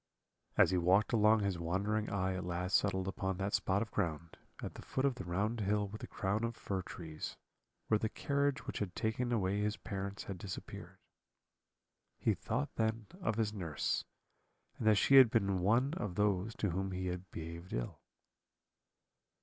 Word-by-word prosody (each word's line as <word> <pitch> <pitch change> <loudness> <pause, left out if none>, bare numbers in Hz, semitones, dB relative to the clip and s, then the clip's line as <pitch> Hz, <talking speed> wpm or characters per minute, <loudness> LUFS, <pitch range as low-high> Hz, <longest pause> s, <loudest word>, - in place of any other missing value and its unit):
"As - - +6
he 90 - +3
walked 95 +7 +3
along 110 0 +5
his 100 -3 0
wandering 100 +6 0
eye 95 -1 0
at 95 0 -3
last 90 +1 -1
settled 95 -2 +2
upon 95 -1 -2
that 100 +1 -2
spot 95 +3 +2
of 115 - -10
ground, 85 -4 -2 0.3
at - - -4
the - - -9
foot 130 - -1
of 140 - +3
the 125 - -7
round 100 +6 -1
hill 105 0 +1
with 110 +1 -8
the - - -5
crown 100 +3 -1
of 115 0 -1
fir 95 -3 -3
trees, 80 -3 -7 0.5
where 110 - +3
the 110 - 0
carriage 140 +2 0
which - - -4
had 95 -4 -3
taken 120 +2 -1
away 100 -3 +1
his 105 +1 0
parents 100 0 -4
had 95 -3 -6
disappeared. 95 -1 -7 1.2
He - - +2
thought 70 - -2
then 110 -1 0
of 110 - 0
his 110 -2 0
nurse, 85 -7 -1 0.8
and 110 - 0
that 110 - +7
she 135 +7 +6
had 130 -3 +10
been 100 -4 +2
one 115 - +3
of 105 - -3
those 105 +1 +1
to 100 - 0
whom 95 +2 -2
he 95 0 -3
had 90 0 -4
behaved 85 +2 -7
ill. - - -3
100 Hz, 180 wpm, -35 LUFS, 90-110 Hz, 1.2 s, had